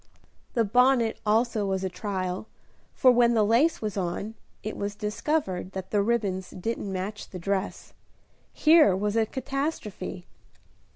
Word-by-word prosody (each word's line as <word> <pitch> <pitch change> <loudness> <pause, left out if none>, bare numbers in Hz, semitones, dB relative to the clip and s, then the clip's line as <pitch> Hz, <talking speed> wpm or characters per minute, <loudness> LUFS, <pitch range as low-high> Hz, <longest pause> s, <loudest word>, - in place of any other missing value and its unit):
The 230 - +4
bonnet 245 +1 +3
also 220 -1 +2
was 190 -1 -1
a - - +1
trial, 185 0 -4 0.5
for 255 - +6
when 240 -1 +4
the 215 -2 +4
lace 235 +7 +3
was 210 -1 -3
on, 190 +4 -3 0.3
it 215 - -4
was 205 0 -3
discovered 210 - -2
that 190 -1 -6
the 205 - +3
ribbons 200 -4 -1
didn't 200 +1 -4
match 195 +3 -5
the 185 - -7
dress. 195 +2 -3 0.6
Here 310 - +5
was 205 +2 -1
a 225 -1 +2
catastrophe! 260 - -4
210 Hz, 140 wpm, -27 LUFS, 190-235 Hz, 0.6 s, for